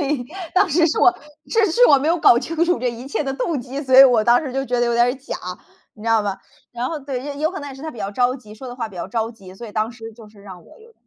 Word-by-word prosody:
所 - - 0
以 280 -3 -1 0.3
当 380 +1 +4
时 330 +2 +3
是 315 - -1
我 365 - +5 0.3
是 450 -2 +2
是 - - +5
我 280 - +6
没 285 +4 -1
有 340 +1 +2
搞 240 - +6
清 330 +5 -1
楚 350 0 +1
这 250 0 -1
一 235 +2 -9
切 280 - -2
的 270 -2 -3
动 275 +2 -2
机， 260 +3 -6
所 260 -2 +2
以 - - +12
我 245 -4 +4
当 240 +1 +5
时 275 -4 -5
就 270 +1 -2
觉 250 -2 -1
得 240 - +2
有 235 - 0
点 235 0 +4
儿 245 - 0
假， 270 0 -7 0.6
你 210 - -15
知 230 - -3
道 225 -1 +3
吧。 200 -2 -3 0.3
然 240 +1 -3
后 325 - -4
对， 280 0 -6
有 310 +2 0
可 380 - -7
能 285 - -7
也 275 - -9
是 270 - -12
他 315 - -5
比 240 - -13
较 200 -1 -3
着 245 +4 +1
急， 215 -5 -14
说 260 +4 -10
的 245 - -7
话 235 -3 -4
比 195 - -14
较 175 - -4
着 225 -1 -2
急， 195 -5 -14
所 235 +5 -9
以 210 - -11
当 215 +1 -1
时 225 -1 -10
就 220 -1 -15
是 210 -1 -19
让 185 -3 -12
我 - - -18
有 460 +1 -18
250 Hz, 355 characters per minute, -20 LUFS, 225-290 Hz, 0.6 s, 以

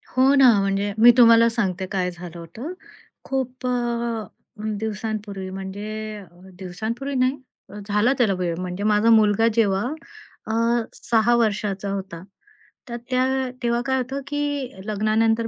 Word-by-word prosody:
हो 260 +2 +5
ना. 270 -2 +7
म्हणजे 195 +1 -1
मी 235 +2 +8
तुम्हाला 230 -1 +7
सांगते 190 -5 -1
काय 185 -2 -1
झालं 175 -1 -10
होतं. 225 - -8 0.5
खूप 255 -2 -4
अ, 235 -2 -2 0.5
दिवसांपूर्वी 210 -3 -4
म्हणजे 205 +3 -6 0.4
दिवसांपूर्वी 220 +9 -5
नाही 255 +2 +2 0.5
झाला 210 +5 +2
त्याला 225 -6 +3
वेळ 175 -2 -1
म्हणजे 180 +2 -4
माझा 210 +1 +3
मुलगा 220 0 +4
जेव्हा 200 -4 +2 0.7
अ, - - -1 0.4
6 230 +1 +2
वर्षाचा 205 -3 0
होता. 190 -3 -6 0.7
तर 235 - -4
त्या 255 0 +2 0.4
तेव्हा 235 0 +1
काय 265 +1 +1
होतं 260 +2 -3
की 290 -3 -2
लग्नानंतर 220 +2 +1
220 Hz, 130 wpm, -23 LUFS, 200-240 Hz, 0.7 s, मी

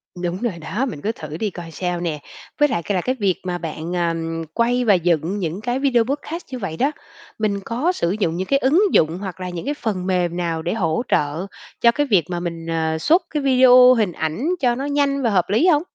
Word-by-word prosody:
Đúng 175 +1 -3
rồi 235 -6 -1
đó, 215 - -2
mình 200 - -6
cứ 215 - -1
thử 155 -8 -8
đi 215 +4 -1
coi 170 -3 -9
sao 180 +1 -3
nè. 165 -3 -3 0.4
Với 295 - +5
lại 170 - -1
c - - -4
là 185 -3 +1
cái 255 +7 -1
việc 195 -4 +2
mà 180 -1 -2
bạn, 165 +1 -5
à, 175 -1 +1
ừm, 165 0 -3
quay 245 +1 +1
và 210 - +5
dựng 175 +1 +1
những 175 +2 -3
cái 245 +3 -1
video 255 -4 +3
podcast 295 +6 -4
như 255 - -4
vậy 165 -7 -4
đó, 275 +3 +2 0.5
mình 205 -2 0
có 255 +10 0
sử 170 - -1
dụng 165 -5 0
những 185 +1 -3
cái 275 - +3
ứng 285 +8 +3
dụng 160 +3 +3
hoặc 190 -2 -6
là 185 0 -4
những 175 +2 -6
cái 290 - -1
phần 205 -10 -3
mềm 180 -2 0
nào 165 -2 -2
để 170 +2 -2
hỗ 165 -6 0
trợ 150 +6 0 0.3
cho 235 - +6
cái 290 +4 0
việc 195 -9 +3
mà 175 -1 -2
mình, 170 -1 -5
ờ, 160 -1 -1
xuất 320 - +3
cái 300 -3 -2
video, 255 -1 +7
hình 215 -6 +1
ảnh 160 - -2
cho 245 -3 +2
nó 270 +3 -4
nhanh 285 -1 +1
và 240 - +2
hợp 185 -4 +1
lý 225 - +3
hông? 305 -3 +4
190 Hz, 250 wpm, -21 LUFS, 170-250 Hz, 0.5 s, video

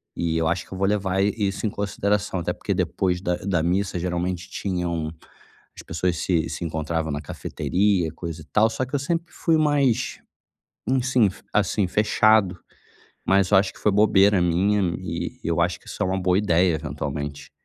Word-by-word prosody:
E 80 -1 -1
eu 80 - +1
acho 85 +3 -1
que - - -24
eu - - -6
vou 95 - +1
levar 95 -2 +1
i 100 - +1
isso 100 -1 -2
em - - +2
consideração, 100 -1 -1
até - - -2
porque - - -3
depois 90 -2 0
da 90 -1 0
da 90 -4 -1
missa 95 +2 0
geralmente 90 +1 -2
tinham 85 -5 -2 0.6
as - - -10
pessoas 90 +1 -1
se 85 -3 0
se - - -5
encontravam 80 -1 -2
na 70 - -2
cafeteria, 95 -1 0
coisa 85 -1 -6
e - - -13
tal, 110 +7 +3
só 115 +3 -2
que 130 - -5
eu 140 - +1
sempre 165 +4 -2
fui 165 -2 +2
mais 140 -6 +1 0.7
enfim, 130 -4 +3 0.2
assim, 105 -1 +2
fechado. 105 -1 +3 0.7
Mas 95 -1 +3
eu 100 - +6
acho 95 -1 +1
que - - -17
foi 105 - +3
bobeira 100 -2 +4
minha 95 +4 +2 0.2
e - - -5
eu 85 +1 0
acho 90 0 -1
que - - -25
isso - - -5
é - - +1
uma 95 +1 -1
boa 90 0 +2
ideia, 90 -4 +3
eventualmente, 70 -1 -5
95 Hz, 185 wpm, -24 LUFS, 85-105 Hz, 0.7 s, eu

